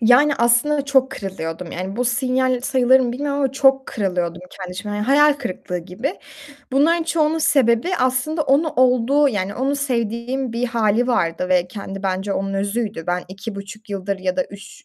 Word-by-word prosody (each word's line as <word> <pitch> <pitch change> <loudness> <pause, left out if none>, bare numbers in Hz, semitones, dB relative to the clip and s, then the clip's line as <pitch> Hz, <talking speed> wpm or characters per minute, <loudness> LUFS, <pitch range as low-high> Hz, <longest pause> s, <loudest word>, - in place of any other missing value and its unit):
Yani 250 +6 +5
aslında 255 +5 +2
çok 265 -2 +2
kırılıyordum, 180 -5 -6
yani 190 +4 -5
bu 250 - 0
sinyal 255 +1 +1
sayılır 260 0 +4
mı 245 -2 -1
bilmiyorum 285 +2 -2
ama 270 -2 +1
çok 270 -1 +3
kırılıyordum 180 -4 -2
kendi 185 -2 -8
içimde 205 +3 -5
yani 210 0 -2
hayal 295 +2 +5
kırıklığı 185 -9 -5
gibi. 195 - -4 0.6
Bunların 325 +5 +3
çoğunun 320 -1 +1
sebebi 255 -1 +2
aslında 260 +5 0
onu 285 +4 +2
olduğu 255 +3 +4
yani 205 -3 -2
onu 270 +4 -1
sevdiğim 245 -1 -2
bir 240 +2 -1
hâli 230 0 +1
vardı 175 -7 0
ve 180 -1 +2
kendi 195 0 -7
bence 195 +1 -1
onun 195 0 -2
özüydü. 200 -2 -2
Ben 180 0 -1
2.5 200 +2 -8
yıldır 195 0 -3
ya 185 -1 -2
da 275 - +1
3 200 +1 -13
235 Hz, 170 wpm, -20 LUFS, 195-270 Hz, 0.6 s, Yani